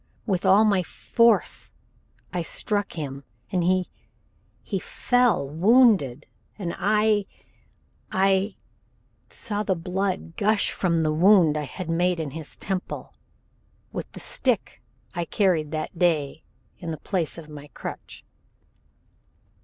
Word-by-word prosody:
With 190 Hz, -3 st, 0 dB
all 200 Hz, +3 st, +6 dB
my 200 Hz, -3 st, +3 dB
force 230 Hz, +6 st, +2 dB, 0.6 s
I 180 Hz, -, -1 dB
struck 205 Hz, +4 st, -2 dB
him, 140 Hz, -4 st, -5 dB, 0.3 s
and 180 Hz, -2 st, +1 dB
he 185 Hz, +1 st, +2 dB, 0.8 s
he -, -, -2 dB
fell 245 Hz, -, +1 dB
wounded 175 Hz, -, +4 dB, 0.3 s
and 175 Hz, -5 st, -3 dB
I 210 Hz, 0 st, +2 dB, 0.8 s
I 195 Hz, +1 st, +2 dB, 0.7 s
saw 210 Hz, -1 st, -3 dB
the 190 Hz, -3 st, 0 dB
blood 180 Hz, 0 st, -3 dB
gush 210 Hz, 0 st, +2 dB
from 170 Hz, -3 st, +1 dB
the 155 Hz, -1 st, +1 dB
wound 175 Hz, -2 st, +5 dB
I 150 Hz, -1 st, -2 dB
had 180 Hz, +6 st, -7 dB
made 175 Hz, +1 st, +1 dB
in 155 Hz, -3 st, -3 dB
his 155 Hz, +1 st, -8 dB
temple 190 Hz, -1 st, -4 dB, 0.8 s
with -, -, -6 dB
the -, -, -8 dB
stick -, -, -1 dB, 0.3 s
I 175 Hz, -2 st, -2 dB
carried 170 Hz, -4 st, +1 dB
that 155 Hz, +2 st, -4 dB
day 155 Hz, -4 st, +1 dB, 0.3 s
in 170 Hz, -, -6 dB
the 160 Hz, -, -3 dB
place 170 Hz, +1 st, -1 dB
of 165 Hz, -2 st, -9 dB
my 150 Hz, -1 st, -10 dB
crutch. -, -, -8 dB
180 Hz, 125 wpm, -25 LUFS, 160-200 Hz, 0.8 s, all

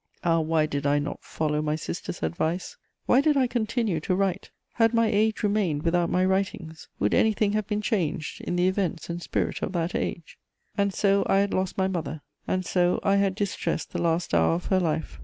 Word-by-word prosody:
Ah, 165 Hz, -1 st, +3 dB
why 160 Hz, -1 st, +2 dB
did 145 Hz, -1 st, -2 dB
I 145 Hz, +1 st, +3 dB
not 145 Hz, 0 st, -4 dB
follow 150 Hz, -1 st, -1 dB
my 155 Hz, 0 st, 0 dB
sister's 155 Hz, -, -5 dB
advice? 160 Hz, -, -2 dB, 0.3 s
Why 255 Hz, -, +5 dB
did 300 Hz, -1 st, +3 dB
I 265 Hz, -, +4 dB
continue 230 Hz, -6 st, -1 dB
to 185 Hz, +4 st, -1 dB
write? 195 Hz, -1 st, -1 dB, 0.2 s
Had 225 Hz, 0 st, +3 dB
my 230 Hz, 0 st, +4 dB
age 220 Hz, +1 st, +1 dB
remained 200 Hz, -8 st, +1 dB
without 170 Hz, 0 st, +2 dB
my 185 Hz, +1 st, +2 dB
writings, 190 Hz, -4 st, -2 dB
would 105 Hz, -, +1 dB
anything 215 Hz, -1 st, +3 dB
have 215 Hz, -2 st, -1 dB
been 210 Hz, 0 st, -2 dB
changed 165 Hz, -8 st, -2 dB
in -, -, -3 dB
the 180 Hz, +1 st, +3 dB
events 185 Hz, -3 st, -1 dB
and 170 Hz, +1 st, -5 dB
spirit -, -, -2 dB
of 190 Hz, -, -3 dB
that 170 Hz, 0 st, -1 dB
age? 165 Hz, -1 st, -4 dB, 0.4 s
And 200 Hz, -1 st, +1 dB
so 200 Hz, +1 st, +2 dB
I -, -, +4 dB
had 200 Hz, 0 st, +1 dB
lost 185 Hz, 0 st, -1 dB
my 190 Hz, -1 st, +2 dB
mother; 160 Hz, -5 st, -4 dB, 0.3 s
and 185 Hz, 0 st, -1 dB
so 180 Hz, -1 st, +2 dB
I 195 Hz, 0 st, +3 dB
had 195 Hz, -1 st, +1 dB
distressed 200 Hz, -2 st, -2 dB
the -, -, -2 dB
last 170 Hz, -, 0 dB
hour 85 Hz, -, +4 dB
of 175 Hz, -, -5 dB
her 190 Hz, -, +2 dB
life! 160 Hz, -, -2 dB
185 Hz, 210 wpm, -26 LUFS, 160-200 Hz, 0.4 s, Why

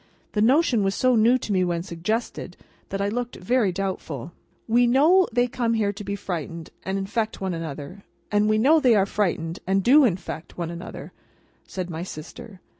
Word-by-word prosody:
The 210 Hz, -, 0 dB
notion 250 Hz, -1 st, +3 dB
was 195 Hz, 0 st, 0 dB
so 255 Hz, -1 st, +3 dB
new 230 Hz, +3 st, +5 dB
to 225 Hz, -, -5 dB
me 185 Hz, -1 st, +2 dB
when 170 Hz, -1 st, -1 dB
suggested, 195 Hz, +6 st, -4 dB, 0.3 s
that 195 Hz, -, -3 dB
I -, -, +1 dB
looked 240 Hz, +3 st, -3 dB
very 220 Hz, +1 st, +1 dB
doubtful. 175 Hz, -6 st, -4 dB, 0.4 s
"We 240 Hz, +2 st, +4 dB
know 315 Hz, +9 st, +5 dB
they 245 Hz, +1 st, +2 dB
come 235 Hz, -1 st, -1 dB
here 205 Hz, -2 st, 0 dB
to 205 Hz, -, -8 dB
be 200 Hz, 0 st, -3 dB
frightened 165 Hz, -4 st, -5 dB
and 190 Hz, +1 st, -3 dB
infect 215 Hz, +3 st, -2 dB
one 190 Hz, -2 st, -2 dB
another, 165 Hz, +3 st, -7 dB, 0.3 s
and 210 Hz, 0 st, +3 dB
we 215 Hz, -, +3 dB
know 290 Hz, +9 st, +5 dB
they 250 Hz, -6 st, +4 dB
are 195 Hz, -2 st, +4 dB
frightened 175 Hz, -5 st, -1 dB
and 195 Hz, 0 st, +2 dB
do 285 Hz, +7 st, +6 dB
infect 180 Hz, -7 st, -2 dB
one 170 Hz, -1 st, -3 dB
another," 170 Hz, +1 st, -8 dB, 0.6 s
said 180 Hz, -2 st, -5 dB
my 160 Hz, 0 st, -5 dB
sister. 180 Hz, +3 st, -9 dB
200 Hz, 190 wpm, -24 LUFS, 180-235 Hz, 0.6 s, do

